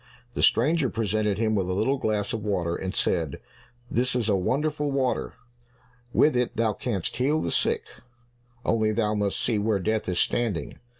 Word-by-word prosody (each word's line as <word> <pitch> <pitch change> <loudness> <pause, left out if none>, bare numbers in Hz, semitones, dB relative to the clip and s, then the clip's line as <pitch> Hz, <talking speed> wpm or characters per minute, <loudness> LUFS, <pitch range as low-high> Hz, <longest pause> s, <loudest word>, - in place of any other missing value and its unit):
The - - -2
stranger 145 +2 +3
presented 110 -2 0
him 110 0 +1
with 95 -3 0
a - - 0
little 130 +8 +1
glass 105 -3 -1
of 110 -2 -3
water, 90 -5 -1
and 95 +1 -4
said, 80 -6 0 0.5
"This 125 +2 +1
is 115 -3 0
a 100 - +4
wonderful 145 +9 0
water, 135 -2 -1 0.8
with 150 +2 +4
it 125 -1 0
thou 110 -2 +2
canst 100 -3 -3
heal 140 +5 +2
the - - -2
sick, - - +1 0.8
only 110 -1 +2
thou 105 -1 +1
must 105 -2 0
see 115 -4 +1
where 105 0 +1
Death 110 +1 -1
is 90 - -1
standing. 110 -6 0
110 Hz, 175 wpm, -26 LUFS, 100-125 Hz, 0.8 s, a